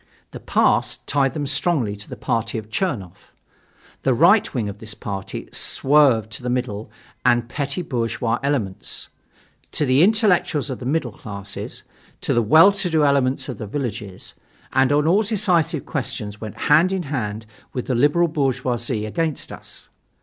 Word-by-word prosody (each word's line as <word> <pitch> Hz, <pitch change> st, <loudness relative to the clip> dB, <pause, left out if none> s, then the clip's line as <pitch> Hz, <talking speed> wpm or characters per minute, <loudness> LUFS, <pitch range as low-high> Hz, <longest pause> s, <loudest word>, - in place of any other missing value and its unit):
The -, -, -8 dB
past -, -, +1 dB
tied 140 Hz, -1 st, +1 dB
them 145 Hz, -2 st, -2 dB
strongly 140 Hz, -, 0 dB
to 105 Hz, -, -12 dB
the -, -, -6 dB
party 115 Hz, 0 st, -2 dB
of 110 Hz, 0 st, -7 dB
Chernoff. 115 Hz, -, -3 dB, 0.7 s
The -, -, +2 dB
right -, -, +5 dB
wing 115 Hz, -4 st, -2 dB
of 100 Hz, 0 st, -7 dB
this 110 Hz, -2 st, -7 dB
party 95 Hz, -2 st, -6 dB
swerved 135 Hz, -6 st, +3 dB
to 105 Hz, -, -5 dB
the 125 Hz, -, -3 dB
middle 120 Hz, -4 st, -2 dB, 0.3 s
and 120 Hz, 0 st, +3 dB
petty 140 Hz, +6 st, -3 dB
bourgeois 120 Hz, -4 st, -1 dB
elements, 130 Hz, -10 st, -2 dB, 0.6 s
to 150 Hz, -, +1 dB
the 130 Hz, +2 st, +4 dB
intellectuals 185 Hz, -, +3 dB
of 130 Hz, -, -5 dB
the 125 Hz, -, -5 dB
middle 135 Hz, -4 st, 0 dB
classes, 100 Hz, -1 st, -7 dB, 0.4 s
to -, -, 0 dB
the 120 Hz, -, +3 dB
well 155 Hz, -, +7 dB
to 195 Hz, -2 st, -1 dB
do 160 Hz, -2 st, +3 dB
elements 135 Hz, -2 st, +2 dB
of 125 Hz, -6 st, -6 dB
the 110 Hz, -, -5 dB
villages; 105 Hz, -6 st, -5 dB, 0.4 s
and 130 Hz, +1 st, +3 dB
on 145 Hz, +1 st, +3 dB
all 185 Hz, +6 st, +4 dB
decisive 185 Hz, -8 st, +1 dB
questions 105 Hz, -7 st, -4 dB
went 110 Hz, -2 st, -7 dB
hand 165 Hz, +5 st, +6 dB
in 190 Hz, -2 st, -1 dB
hand 115 Hz, -7 st, -3 dB, 0.3 s
with 125 Hz, -, -4 dB
the 130 Hz, -, -1 dB
liberal 145 Hz, +8 st, +3 dB
bourgeoisie 125 Hz, -6 st, -1 dB
against 155 Hz, +7 st, -2 dB
us. -, -, -8 dB
130 Hz, 165 wpm, -22 LUFS, 110-155 Hz, 0.7 s, well